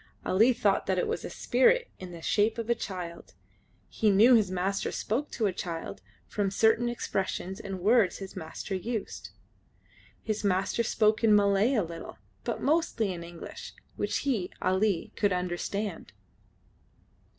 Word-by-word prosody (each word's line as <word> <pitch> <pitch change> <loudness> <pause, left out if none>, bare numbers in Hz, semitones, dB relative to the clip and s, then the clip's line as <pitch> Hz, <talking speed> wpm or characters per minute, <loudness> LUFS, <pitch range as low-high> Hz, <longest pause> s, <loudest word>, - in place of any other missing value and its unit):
Ali 220 +7 +4
thought 205 -5 +1
that 190 - +1
it - - +1
was - - -2
a - - -5
spirit - - +3
in 185 -1 -8
the 170 -1 -10
shape 215 +2 +2
of 230 0 -2
a - - +6
child. 180 -6 -7 0.5
He 220 - +1
knew 215 +6 +6
his 215 -5 +4
master 185 +2 -1
spoke 260 +8 -2
to 225 - 0
a 195 - +1
child 170 -2 -5 0.2
from 205 -2 -1
certain 220 +4 +3
expressions 190 -4 -3
and 195 -2 -5
words 215 0 +3
his 195 -1 -8
master 185 +3 -6
used. 215 +3 -4 0.9
His 215 -1 -2
master 195 +3 +1
spoke 215 -1 +2
in 215 -2 +6
Malay 205 +5 +3
a 215 - +2
little, 165 0 -8 0.3
but - - -3
mostly 280 - +1
in 170 -1 -7
English, 170 0 -9 0.2
which - - -1
he, 220 -10 0
Ali, 190 -1 0
could 205 -2 +1
understand. 180 - -3
200 Hz, 155 wpm, -29 LUFS, 185-225 Hz, 0.9 s, a